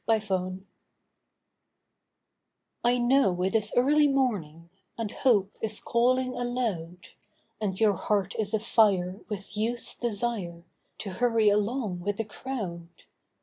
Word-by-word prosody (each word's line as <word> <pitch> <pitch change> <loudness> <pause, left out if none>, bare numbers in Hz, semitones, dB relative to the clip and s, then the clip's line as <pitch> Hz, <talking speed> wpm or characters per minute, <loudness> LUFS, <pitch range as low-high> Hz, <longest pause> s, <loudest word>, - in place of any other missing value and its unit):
TIME 220 -1 +4
ENOUGH 185 -2 -2 2.2
I 240 +1 +3
know 240 -8 +3
it 190 - 0
is 215 -1 +3
early 295 +4 +5
morning, 185 - -1 0.3
And 225 -3 -3
hope 205 -6 +2
is 215 -1 -1
calling 255 +2 +1
aloud, 230 -9 -3 0.5
And 190 -3 -2
your 215 -2 +4
heart 200 -1 -1
is 210 -2 -1
afire 200 -4 +2
with 205 -1 -6
Youth's 230 +3 -2
desire 205 -7 -2 0.3
To 205 - -5
hurry 225 +1 +3
along 210 -2 0
with 200 +3 -2
the 225 - -2
crowd. 205 -8 -5
215 Hz, 120 wpm, -28 LUFS, 190-240 Hz, 2.2 s, early